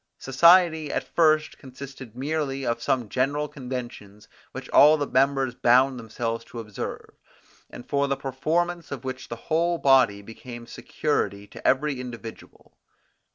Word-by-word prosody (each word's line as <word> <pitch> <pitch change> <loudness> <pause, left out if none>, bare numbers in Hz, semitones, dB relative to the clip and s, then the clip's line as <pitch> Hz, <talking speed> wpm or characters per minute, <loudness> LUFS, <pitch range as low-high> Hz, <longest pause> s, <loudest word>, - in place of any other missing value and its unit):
Society 160 +2 +4
at - - -1
first 155 -2 +1
consisted 130 -3 -11
merely 135 0 -2
of 115 - -1
some 125 -4 0
general 140 +6 -1
conventions 120 -7 -8 0.2
which - - -8
all 150 +2 +7
the 145 - -1
members 135 -1 +1
bound 125 +1 +3
themselves 115 0 -4
to 120 - -9
observe, 105 -3 -7 0.6
and 120 - -11
for 140 0 +1
the 140 0 -1
performance 165 +6 -2
of 140 -1 -6
which 130 -1 -6
the 115 - -4
whole 170 +7 0
body 130 -9 +3
became 120 +2 -10
security 100 -6 -2
to - - -6
every 135 0 +1
individual. 115 -2 -10
130 Hz, 140 wpm, -25 LUFS, 120-150 Hz, 0.6 s, all